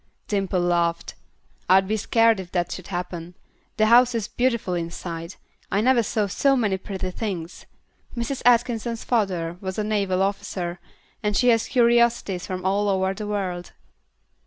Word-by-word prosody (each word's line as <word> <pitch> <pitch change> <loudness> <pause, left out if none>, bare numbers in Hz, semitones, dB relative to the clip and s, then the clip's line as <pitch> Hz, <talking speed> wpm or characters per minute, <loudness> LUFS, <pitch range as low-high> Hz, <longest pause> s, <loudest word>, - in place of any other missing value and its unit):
Dimple 195 -3 0
laughed. 170 -1 0 0.6
"I'd 190 +1 +5
be 215 - 0
scared 225 0 +3
if 180 -2 -8
that 175 -1 0
should 185 - -7
happen. 175 -1 -5 0.4
The 215 - +4
house 240 +2 +5
is 220 -3 -1
beautiful 235 -7 0
inside. 170 0 -5 0.4
I 200 - +2
never 245 +2 +4
saw 215 -1 0
so 275 +8 +2
many 210 -7 +1
pretty 190 -1 -5
things. 180 -5 -5 0.5
Mrs. 235 +3 -3
Atkinson's 235 -1 +2
father 180 -8 -1
was 190 -1 -5
a 215 - 0
naval 200 -3 0
officer, 195 -3 -3 0.4
and 210 -1 0
she 250 - +4
has 225 -1 +3
curiosities 235 -6 +2
from 185 0 -5
all 200 +2 +1
over 190 0 +1
the 210 +1 -6
world." 185 -4 -3
200 Hz, 155 wpm, -24 LUFS, 180-230 Hz, 0.6 s, I'd